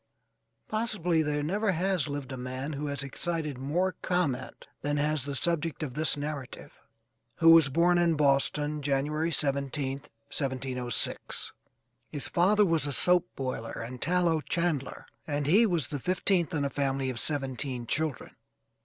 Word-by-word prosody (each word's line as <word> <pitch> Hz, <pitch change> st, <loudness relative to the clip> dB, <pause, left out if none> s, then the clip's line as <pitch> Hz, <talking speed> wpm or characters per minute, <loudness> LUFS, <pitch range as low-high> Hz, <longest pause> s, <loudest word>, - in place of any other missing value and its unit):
Possibly 205 Hz, -7 st, 0 dB
there 150 Hz, -1 st, -1 dB
never 200 Hz, +6 st, 0 dB
has 180 Hz, -2 st, 0 dB
lived 140 Hz, -2 st, -5 dB
a -, -, -4 dB
man 130 Hz, +4 st, -5 dB
who 145 Hz, +1 st, -4 dB
has 140 Hz, 0 st, -3 dB
excited 150 Hz, 0 st, -3 dB
more 170 Hz, +8 st, 0 dB
comment 170 Hz, -9 st, -2 dB
than 145 Hz, +1 st, -1 dB
has 150 Hz, -1 st, 0 dB
the 140 Hz, -1 st, -4 dB
subject 165 Hz, +2 st, 0 dB
of 135 Hz, -5 st, -4 dB
this 155 Hz, +2 st, +2 dB
narrative, 145 Hz, -3 st, -6 dB, 0.6 s
who 165 Hz, 0 st, +6 dB
was 165 Hz, -4 st, +7 dB
born 175 Hz, +5 st, +3 dB
in 170 Hz, -2 st, +3 dB
Boston, 150 Hz, +1 st, +1 dB
January 145 Hz, +3 st, 0 dB
17th, 140 Hz, -2 st, -2 dB, 0.3 s
1706. 130 Hz, -3 st, -2 dB, 0.6 s
His 145 Hz, -, 0 dB
father 205 Hz, +4 st, +3 dB
was 165 Hz, -4 st, +2 dB
a -, -, -2 dB
soap 180 Hz, +6 st, +5 dB
boiler 130 Hz, -4 st, -4 dB
and 125 Hz, +1 st, -9 dB
tallow 170 Hz, -2 st, +2 dB
chandler, 165 Hz, -4 st, -2 dB, 0.2 s
and 145 Hz, -1 st, -1 dB
he 205 Hz, +10 st, +5 dB
was 170 Hz, -, 0 dB
the 145 Hz, -, -4 dB
fifteenth 185 Hz, +1 st, 0 dB
in 145 Hz, -2 st, 0 dB
a 140 Hz, -, -2 dB
family 135 Hz, -2 st, -1 dB
of 120 Hz, -, -7 dB
seventeen 130 Hz, -4 st, 0 dB
children. 150 Hz, +2 st, -2 dB
150 Hz, 150 wpm, -29 LUFS, 135-170 Hz, 0.6 s, was